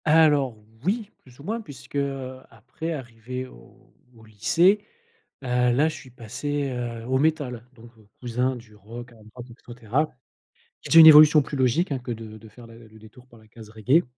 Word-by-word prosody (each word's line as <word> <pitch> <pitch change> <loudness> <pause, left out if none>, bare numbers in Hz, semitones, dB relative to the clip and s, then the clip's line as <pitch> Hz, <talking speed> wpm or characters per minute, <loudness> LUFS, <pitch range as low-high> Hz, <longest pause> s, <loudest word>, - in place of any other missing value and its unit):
Alors 150 -6 +3 0.3
oui, 210 +4 -2
plus 125 0 -21
ou - - -12
moins, 225 +7 -4
puisque, 135 - -13
heu, 135 -2 -3
après 160 +6 -7
arriver 125 -2 -7
au - - -19 0.3
au 110 -1 -18
lycée, 175 - +2 0.6
heu, - - -6
là, 125 +4 +2
je - - -7
suis 130 - -12
passé, 140 +4 -4
heu, 120 -2 -5
au 130 +1 +1
métal, 140 -6 -1
donc 115 0 -16 0.3
cousin 125 +2 -2
du 115 -3 -16
rock, 120 +4 -11
hard 110 -2 -19
rock, 125 -1 -9
et - - -11 0.3
cetera. 130 +7 -1 0.7
C'est - - -2
une 160 - +11
évolution 155 0 +9
plus 140 - -7
logique, 130 +7 +1
hein, 135 - -1
que 125 -1 -6
de 110 -1 -9
de 110 - -15
faire 115 +3 -15
le 115 0 -15
détour 110 +3 -17
par 120 -2 -19
la 110 - -22
case 110 0 -14
reggae 120 +9 +2
125 Hz, 185 wpm, -24 LUFS, 115-145 Hz, 0.7 s, une